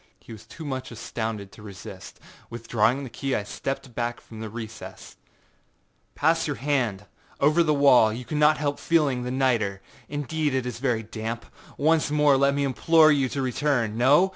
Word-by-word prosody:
He - - -15
was 110 0 -11
too 160 +7 -10
much 130 -2 -4
astounded 110 -3 -5
to - - -14
resist. 100 -4 -10 0.3
Withdrawing 115 +3 0
the 130 - -7
key 135 +3 -2
I 105 - -1
stepped 135 +5 -5
back 120 0 -3
from 110 - -12
the 110 -1 -5
recess. 110 0 -9 1.0
âPass 165 +2 +2
your 145 - -2
hand,â 120 -8 -1 0.3
I - - +2
said, 150 - +5
âover 170 +2 +4
the 155 -2 +2
wall; 125 -6 +6
you 120 +3 -6
cannot 150 +1 +3
help 145 -1 -2
feeling 150 -7 +1
the 125 - -4
nitre. 120 -7 0 0.3
Indeed 145 0 -2
it 130 -1 -1
is 120 -2 -5
very 120 -4 0
damp. 110 +1 -5 0.3
Once 155 +1 +2
more 150 -1 +4
let 140 +1 +3
me 140 - 0
implore 155 +4 +4
you 135 -3 +2
to 135 +1 -3
return. 125 -4 0
No? 145 +10 +4
130 Hz, 185 wpm, -25 LUFS, 115-145 Hz, 1.0 s, wall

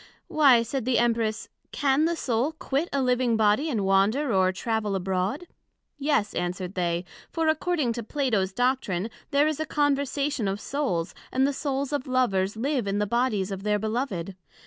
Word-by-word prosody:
Why, 270 -6 +5
said 245 +1 -3
the 255 -1 +2
Empress, 230 -2 +1 0.2
can 280 +1 +2
the 340 +1 +1
Soul 260 0 0
quit 300 +1 -2
a 275 -1 0
living 250 -2 +2
Body, 215 +8 +3
and 215 -8 -1
wander 210 +8 +2
or 185 -1 +3
travel 215 +1 -2
abroad? 190 - -1 0.5
Yes, 280 -8 +1
answered 180 +1 -3
they, 175 -1 -1 0.2
for 325 -1 -1
according 315 -5 +1
to 235 - -4
Plato's 225 -6 0
Doctrine, 230 -4 0 0.2
there 285 +1 +3
is 310 -1 -2
a 315 - -1
Conversation 280 -3 0
of 195 +1 -2
Souls, 225 - -2 0.2
and 260 +1 +2
the 280 - +1
Souls 280 0 -2
of 280 -2 -2
Lovers 215 -6 +1
live 260 -2 -1
in 200 +1 0
the 210 - +1
Bodies 215 -3 0
of 195 -1 -4
their 210 +1 +1
Beloved. 215 -4 -3
240 Hz, 170 wpm, -26 LUFS, 200-280 Hz, 0.5 s, Why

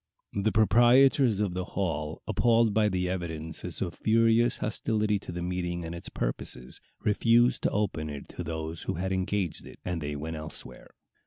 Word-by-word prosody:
The 100 +2 +1
proprietors 120 +2 +5
of 100 -4 0
the 90 0 -2
hall, 80 -5 -2
appalled 115 +1 +3
by 105 0 +3
the 90 -1 -1
evidences 80 -3 -4
of 85 -2 -4
furious 115 +2 +3
hostility 105 -1 0
to 95 - -8
the 85 0 -4
meeting 90 -1 -2
and 80 - -5
its 85 - -7
purposes, 60 +1 -4 0.2
refused 115 +3 +3
to - - +2
open 90 -7 -1
it 75 -1 -7
to - - -6
those 80 0 -4
who - - -3
had 95 +3 -2
engaged 95 -2 -1
it, - - -12
and 90 -2 -2
they 75 0 -3
went 80 +2 -4
elsewhere. 75 0 -8
95 Hz, 170 wpm, -28 LUFS, 80-110 Hz, 0.2 s, proprietors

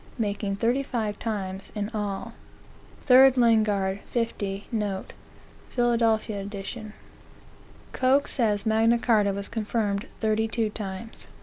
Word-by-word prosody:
making 205 -3 -1
thirty 240 +6 +1
five 220 -6 -3
times 195 -3 -4
in 205 -1 -2
all. 205 -2 -3 0.7
3 265 0 +8
Lingard, 215 -5 +2
50, 205 -4 -2
note, 205 -4 -3 0.6
Philad. 240 -1 +1 0.3
ed. 205 +1 -6 1.0
Coke 265 +2 +2
says 210 -4 0
Magna 225 +2 +3
Carta 215 -4 +3
was 200 0 -4
confirmed 215 -2 -2
thirty 220 0 +1
two 220 -1 -1
times. 205 +1 -7
215 Hz, 110 wpm, -26 LUFS, 200-230 Hz, 1.0 s, 3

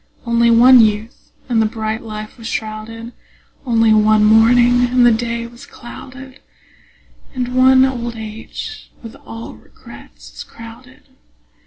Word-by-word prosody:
Only 235 0 +2
one 245 +2 +6
youth, 220 +2 -2 0.2
and 235 -3 +1
the 220 - +1
bright 220 0 -5
life 215 +1 -9
was 225 - -8
shrouded; 225 +2 -6 0.5
Only 225 -2 +3
one 215 0 +3
morning, 240 +3 +4
and 250 0 +2
the 240 - +5
day 235 +1 -3
was 235 +1 -14
clouded; 260 +2 -12 1.0
And 250 -1 -4
one 260 0 +5
old 240 -3 -4
age 225 - -9
with 230 - -10
all 225 0 -9
regrets - - -16
is - - -9
crowded. 230 +3 -15
230 Hz, 135 wpm, -17 LUFS, 220-245 Hz, 1.0 s, one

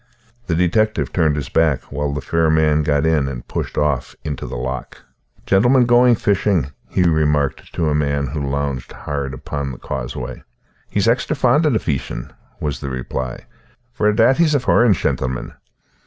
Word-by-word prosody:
The 85 - 0
detective 110 +6 +1
turned 80 -4 +2
his 75 -3 -4
back 80 -5 +2
while 75 +1 -2
the 70 0 -3
fair 80 +3 +1
man 80 -1 +3
got 75 0 +1
in 80 -4 +2
and 60 -3 -6
pushed - - -4
off 75 -4 0
into 75 -3 -4
the - - -6
loch. 65 +1 -5 0.5
"Gentleman 120 +6 +4
going 120 0 +5
fishing?" 95 - +1 0.2
he 90 - +1
remarked 75 -4 +1
to 80 - 0
a 75 - +1
man 70 -1 0
who 75 +3 -4
lounged 70 -1 -3
hard 70 -2 -4
by - - -6
upon 70 +1 -4
the 60 - -8
causeway. 65 +1 -5 0.5
"He's 100 - 0
axtra 125 +6 +1
fond 135 +5 +3
o' - - +4
the 120 - +2
feeshin'," 70 - -3 0.3
was 75 -2 -3
the 70 - -5
reply, 65 0 -5 0.5
"for 105 -4 +2
a' 105 - +1
that 120 +4 +4
he's 160 -3 +3
a - - +4
foreign 120 -3 +4
shentleman." 65 -7 -2
75 Hz, 180 wpm, -20 LUFS, 70-105 Hz, 0.5 s, going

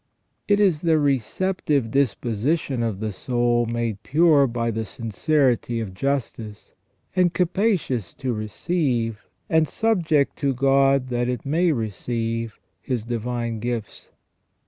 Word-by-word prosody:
It 205 0 +3
is 185 -7 +3
the 165 -2 +3
receptive 145 - 0
disposition 130 +1 0
of 110 -4 -2
the 110 -1 -2
soul 120 +2 0
made 115 -3 -2
pure 150 +1 +4
by 115 -1 -1
the 110 0 -2
sincerity 120 - 0
of 105 -5 -5
justice, 115 -3 -3 0.4
and 180 -2 +2
capacious 180 - 0
to 130 -3 -2
receive, 115 - -2 0.2
and 160 -1 +3
subject 165 -11 +1
to 140 -2 0
God 135 0 +3
that 120 0 0
it 125 -3 -3
may 165 +5 +2
receive. 115 -1 -3 0.2
His 125 -5 -2
divine 120 -1 -3
gifts. 115 -2 -5
125 Hz, 125 wpm, -23 LUFS, 115-150 Hz, 0.4 s, pure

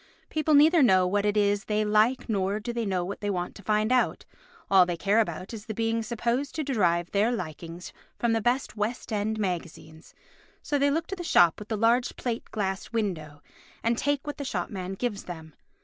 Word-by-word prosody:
People 310 -1 +2
neither 315 +3 +6
know 190 -8 +5
what 200 +3 +1
it 205 0 +1
is 205 -1 +2
they 215 0 0
like 215 +5 +2
nor 200 -2 0
do 235 +3 -5
they 200 -3 -2
want 180 -2 -2
to - - -12
find 215 +2 +1
out, 255 -1 +1 0.4
all 190 -2 +6
they 175 -1 -2
care 200 +6 +2
about 185 -1 -2
is 220 0 -8
the 220 - -4
being 225 +1 0
supposed 235 +4 -2
to 315 - -1
derive 175 - +1
their 210 +4 +2
likings 170 -4 -6 0.2
from 235 -1 +1
the 225 - +1
best 245 +3 0
West 220 +2 -3
end 215 +1 -1
magazines, 170 -5 -5 0.5
so 290 -1 0
they 285 +1 +3
look 325 +3 0
to 390 - -5
the 355 - -6
shop 175 - +4
with 210 - -9
the 220 - -2
largest 235 +3 +2
plate 235 -2 -3
glass 195 -2 -3
windows 165 -10 -3 0.4
and 230 +1 +2
take 285 +3 -1
what 295 0 -5
the 285 - -4
shop 190 -10 -3
man 190 -2 -5
gives 205 0 -3
them. 160 -3 -9
210 Hz, 200 wpm, -27 LUFS, 185-240 Hz, 0.5 s, neither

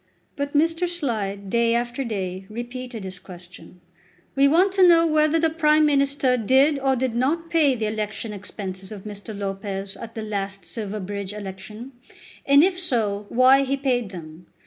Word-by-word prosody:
But 285 0 -3
Mr. 330 +4 +2
Slide, 215 - -3
day 235 0 +2
after 240 +3 -2
day, 190 -5 -4
repeated 240 0 -7
his 190 0 -5
question, 180 0 -13 0.5
"We 275 0 +5
want 355 +7 +4
to 380 -1 +5
know 335 -1 +6
whether 310 0 +3
the 325 0 +2
Prime 310 -1 +3
Minister 275 -3 +2
did 265 +6 +3
or 270 -1 +1
did 255 -1 -1
not 315 +8 -1
pay 300 -5 +3
the 220 -2 -2
election 215 0 -4
expenses 190 -1 -7
of 205 -3 -8
Mr. 205 0 -8
Lopez 195 0 -4
at 230 - -10
the 220 - -4
last 200 -2 -4
Silverbridge 205 -2 -5
election, 210 +4 -8 0.6
and 280 +2 +7
if 365 0 +1
so, 210 - 0
why 260 +2 +5
he 275 0 -1
paid 250 -5 0
them. 165 -2 -11
235 Hz, 165 wpm, -23 LUFS, 200-280 Hz, 0.6 s, and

